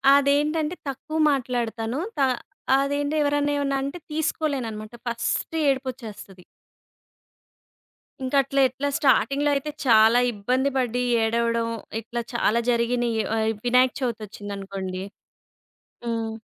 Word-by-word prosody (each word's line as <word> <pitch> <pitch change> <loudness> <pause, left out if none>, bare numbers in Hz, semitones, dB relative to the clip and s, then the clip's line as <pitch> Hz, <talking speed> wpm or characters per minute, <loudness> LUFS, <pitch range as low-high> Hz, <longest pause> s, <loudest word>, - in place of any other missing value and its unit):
అదేంటంటే, 300 +3 +2
తక్కువ 290 +4 -5
మాట్లాడతాను. 240 -2 -2 0.2
త - - -4 0.6
అదేంటి, 285 +2 0
ఎవరన్నా 290 0 +1
ఏవన్నంటే 275 +2 -1
తీసుకోలేననమాట. 265 -8 -2
ఫస్టే 235 +7 -1
ఏడుపొచ్చేస్తది. 235 -8 -5 1.8
ఇంకట్ల 275 +1 +1
ఎట్లా, 270 +3 -3
స్టార్టింగ్‌లో 285 0 +3
అయితే 280 +2 -2 0.2
చాలా 225 0 +6
ఇబ్బంది 250 +7 0
పడీ, 245 -1 0 0.2
ఏడవడం 230 +1 +1 0.3
ఇట్లా 235 +2 -4
చాలా 235 -1 +2
జరిగినియి. 235 -1 +1
ఆహ్, 220 0 +1 0.2
వినాయక 250 +1 +4
చవితొచ్చిందనుకోండి 200 -5 -4 1.0
హ్మ్. 225 -1 -2
245 Hz, 90 wpm, -24 LUFS, 225-280 Hz, 1.8 s, చాలా